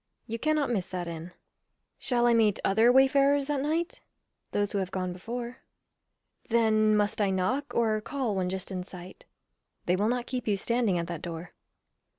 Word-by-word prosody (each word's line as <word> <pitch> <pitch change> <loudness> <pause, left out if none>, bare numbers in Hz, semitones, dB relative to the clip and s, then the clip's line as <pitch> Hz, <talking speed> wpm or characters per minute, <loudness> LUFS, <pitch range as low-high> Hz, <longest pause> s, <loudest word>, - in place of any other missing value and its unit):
You 230 0 -4
cannot 305 -1 +1
miss 195 -6 -1
that 180 -2 -4
inn. 170 +1 -6 0.7
Shall 240 -2 +1
I 240 - +5
meet 220 -3 +3
other 220 +5 +5
wayfarers 275 +2 +4
at 280 -2 0
night? 320 +4 -1 0.5
Those 205 -1 0
who 200 - 0
have 190 -2 -2
gone 185 -1 -3
before. 235 +6 -6 0.9
Then 215 -2 +3
must 205 +1 0
I 200 - +3
knock, 190 +10 -1
or 220 -2 +2
call 255 -2 -2
when 185 -1 0
just 190 +1 -5
in 185 -1 -3
sight? 180 0 -11 0.6
They 180 - +2
will 205 +4 +1
not 245 0 -1
keep 250 -2 -4
you 205 -2 +2
standing 230 -2 +1
at 170 - -1
that 170 -2 -5
door. 170 0 -7
215 Hz, 175 wpm, -28 LUFS, 185-245 Hz, 0.9 s, I